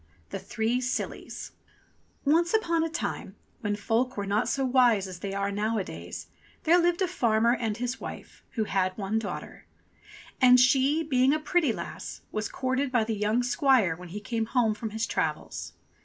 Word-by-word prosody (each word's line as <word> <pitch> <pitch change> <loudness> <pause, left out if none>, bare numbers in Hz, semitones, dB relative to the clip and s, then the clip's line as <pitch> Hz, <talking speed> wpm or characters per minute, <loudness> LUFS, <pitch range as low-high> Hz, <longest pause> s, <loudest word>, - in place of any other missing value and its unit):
THE - - -3
THREE 235 +2 -1
SILLIES 255 0 -4 0.7
ONCE 335 +7 +3
upon 335 -7 +2
a 330 - -1
time, 325 - -4 0.2
when 205 -1 -1
folk 230 +4 0
were 200 - -2
not 205 +4 +1
so 270 -1 0
wise 245 -6 +4
as 185 -2 -8
they 200 - -4
are 200 0 -1
nowadays, 210 0 -3 0.4
there 345 +2 +5
Hved 345 0 +2
a 375 - +3
farmer 235 -8 +2
and 225 -3 -2
his 245 +1 -3
wife - - -9
who 225 - 0
had 185 -3 0
one 210 +2 0
daughter. 215 - -7 0.7
And 250 0 +8
she, 270 +5 +4
being 265 -2 +3
a - - -1
pretty 310 -2 +2
lass, - - -6
was 215 -1 -2
courted 260 +1 -1
by 240 -3 +3
the 220 +1 -2
young 215 +3 +1
squire 250 - +3
when 180 +1 -11
he 205 +5 -5
came 225 +1 -2
home 230 -3 +2
from 220 +1 -5
his 220 +2 -2
travels. - - -3
235 Hz, 175 wpm, -28 LUFS, 210-270 Hz, 0.7 s, And